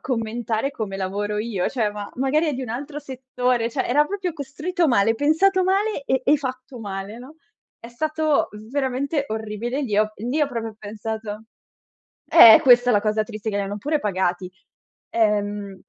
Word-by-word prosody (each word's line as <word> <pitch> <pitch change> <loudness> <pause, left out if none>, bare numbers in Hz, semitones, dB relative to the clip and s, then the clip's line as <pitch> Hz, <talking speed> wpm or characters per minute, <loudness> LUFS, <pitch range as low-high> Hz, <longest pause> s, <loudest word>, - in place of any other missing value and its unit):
commentare 230 +1 -2
come 210 -7 -5
lavoro 205 +2 -3
io, 210 -4 -1
cioè, 220 -5 -1
ma 205 -1 -7
magari 270 +5 +1
è 300 - 0
di 260 - -4
un 235 - -6
altro 285 +5 -5
settore, 255 -3 -2
cioè 260 - -2
era 295 +5 +3
proprio 380 -1 -3
costruito 315 +4 -2
male, 225 -2 +3
pensato 370 - +3
male 390 -2 0
e 265 -1 +1
e 290 +3 +5
fatto 255 -2 -6
male, 200 +1 -6
no. 270 +6 -12 0.4
È 230 - -11
stato 310 +4 0 0.2
veramente 280 +1 -1
orribile. 220 +5 -3
Lì 215 -7 -2
ho 215 0 +2
lì 245 +8 -2
ho 295 - +3
proprio 225 -3 -5
pensato 215 0 -6 0.9
eh 230 -9 +9
questa 245 -1 +6
è 245 - +4
la 205 - +3
cosa 215 0 0
triste, 215 -1 -6
che 200 - -2
li - - 0
hanno 200 +1 -4
pure 295 +8 -1
pagati. 185 -4 -1 0.6
Ehm 205 -3 -1
240 Hz, 175 wpm, -22 LUFS, 210-280 Hz, 0.9 s, eh